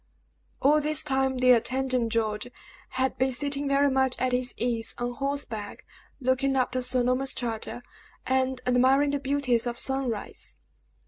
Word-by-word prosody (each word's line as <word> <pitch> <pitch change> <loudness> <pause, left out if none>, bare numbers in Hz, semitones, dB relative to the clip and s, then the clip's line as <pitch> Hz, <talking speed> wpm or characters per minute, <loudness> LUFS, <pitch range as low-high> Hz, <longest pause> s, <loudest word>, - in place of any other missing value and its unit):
All 300 +3 +5
this 305 0 +2
time, 265 -2 0
the 255 0 +5
attendant, 250 0 +1
George, 215 -1 -1 0.4
had 260 -1 -1
been 260 +1 +2
sitting, 280 +2 -1
very 280 0 +3
much 265 -1 +1
at 255 0 0
his 250 0 0
ease, 230 -2 -1
on 245 0 -2
horseback, 250 -6 -4 0.3
looking 265 +1 +1
after 255 0 0
Sir 250 0 +2
Norman's 255 +2 +1
charger 240 0 -4 0.4
and 260 0 0
admiring 260 +3 +3
the 285 - -1
beauties 265 -4 0
of 240 0 -3
sunrise. 265 -6 -2
260 Hz, 145 wpm, -27 LUFS, 245-270 Hz, 0.4 s, All